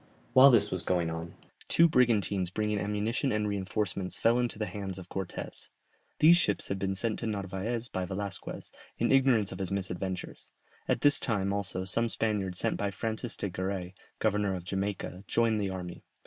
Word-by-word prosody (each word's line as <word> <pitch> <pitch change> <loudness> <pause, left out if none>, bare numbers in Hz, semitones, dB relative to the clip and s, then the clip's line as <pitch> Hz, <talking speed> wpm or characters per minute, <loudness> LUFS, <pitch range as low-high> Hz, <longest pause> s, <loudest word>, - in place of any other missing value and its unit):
While 130 +2 +9
this 105 -5 +4
was 95 - -1
going 85 -2 0
on, 80 +1 -6 0.3
two 170 - +6
brigantines 105 - +2
bringing 105 +2 -1
ammunition 105 +6 0
and 105 0 0
reinforcements 100 -1 -2
fell 115 +2 +3
into 120 -3 -1
the 105 - -1
hands 95 -1 -5
of 90 -1 -10
Cortès; 95 -2 -5 0.5
these 170 +3 +7
ships 105 - 0
had 100 - -2
been 95 0 -1
sent 110 +3 -1
to 115 - -3
Narvaez 105 +3 -3
by 95 -4 -3
Velasquez, 100 +2 -5 0.3
in - - +1
ignorance 130 -6 +4
of 95 - -7
his 95 -2 -2
misadventures; 95 -1 -4 0.4
at - - +1
this 145 0 +5
time 100 -4 0
also 100 -2 -1
some 115 +5 +1
Spaniards 100 -5 -1
sent - - 0
by 100 - -1
Francis 110 +3 -3
de - - -2
Garay, 95 0 -3 0.2
governor 105 -2 +1
of 90 - -6
Jamaica, 95 -1 -3
joined 115 -2 +2
the 100 - -1
army. 90 -2 -6
100 Hz, 175 wpm, -30 LUFS, 95-110 Hz, 0.5 s, While